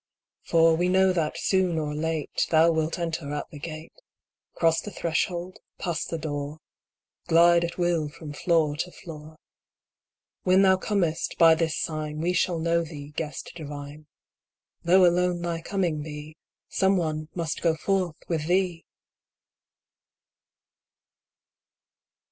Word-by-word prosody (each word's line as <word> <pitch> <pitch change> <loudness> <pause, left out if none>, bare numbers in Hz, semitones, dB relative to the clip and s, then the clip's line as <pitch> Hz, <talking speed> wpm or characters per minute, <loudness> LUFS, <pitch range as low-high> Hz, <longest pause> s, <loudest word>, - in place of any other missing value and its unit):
For 165 0 +4
we 175 +2 +1
know 190 0 +4
that, 165 -4 -1
soon 185 -3 +1
or 150 -1 -2
late, 155 -1 -1
Thou 165 +1 +5
wilt 160 +1 -1
enter 165 -4 -3
at 145 - -4
the 150 - -9
gate, 155 +1 -8 0.6
Cross 165 0 +2
the - - -7
threshold, 175 0 -2 0.2
pass 175 -3 -2
the 165 - -4
door, 145 -1 -4 0.7
Glide 170 +1 +5
at 170 0 -4
will 170 -4 +1
from 150 0 -9
floor 155 -1 +1
to 180 - -2
floor. 155 -4 -11 1.1
When 185 +1 +4
thou 190 -1 +5
comest, 185 -5 -1
by 165 -1 +7
this 160 -1 0
sign 155 -1 -3
We 175 +3 0
shall 175 -1 +1
know 170 +1 +1
thee. 150 -3 -9
Guest 150 -1 -5
divine: 145 -1 -8 0.8
Though 180 +2 +6
alone 175 0 +2
thy 170 -1 -2
coming 175 -4 -1
be, 150 0 -8 0.3
Someone 160 -5 0
must 165 -2 -3
go 165 -2 +2
forth 185 -1 -1
with 160 -3 -2
thee 180 -2 0
165 Hz, 130 wpm, -26 LUFS, 155-175 Hz, 1.1 s, by